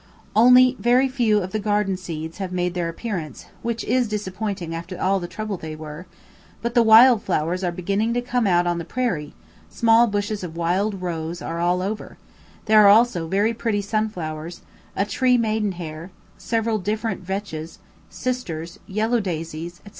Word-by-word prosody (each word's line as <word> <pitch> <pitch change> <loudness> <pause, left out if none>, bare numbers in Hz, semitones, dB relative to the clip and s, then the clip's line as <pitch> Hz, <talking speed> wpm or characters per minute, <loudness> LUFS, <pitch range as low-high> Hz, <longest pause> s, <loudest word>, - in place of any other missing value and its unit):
Only 250 +3 +7
very 250 +3 +4
few 230 -6 +1
of 185 - -6
the 215 - -1
garden 205 -2 0
seeds 165 -2 -7
have 190 -2 -4
made 180 -1 -1
their 175 -2 -2
appearance, 165 - -5 0.2
which 235 0 -3
is 250 +1 +1
disappointing 200 -4 -4
after 170 +2 -6
all 195 +1 +2
the 175 - -5
trouble 215 +1 -5
they 160 -2 -7
were; 155 +3 -9 0.5
but 235 0 -3
the 240 - +5
wild 230 +1 +7
flowers 180 0 -1
are 175 - 0
beginning 200 +6 -1
to 245 - +1
come 245 -2 0
out 175 -1 +3
on 175 -1 0
the - - -4
prairie, 175 -7 -3 0.3
small 230 +1 +4
bushes 205 -1 -2
of 165 -2 -7
wild 185 +3 0
roses 170 0 -4
are 165 0 -4
all 175 +1 +1
over; 210 +3 -5 0.5
there 215 -1 +6
are - - +7
also 205 -6 +4
very 205 +6 +1
pretty 220 -3 -1
sunflowers, 175 -6 -3 0.3
a 195 - +1
tree 250 +4 +2
maiden 215 -3 0
hair, 165 0 -7 0.3
several 225 -1 -1
different 210 +1 -2
vetches, 185 -4 -5 0.3
sisters, 170 -11 -4
yellow 220 +4 0
daisies, 165 -2 -5
&c. - - -10
195 Hz, 170 wpm, -23 LUFS, 170-220 Hz, 0.5 s, Only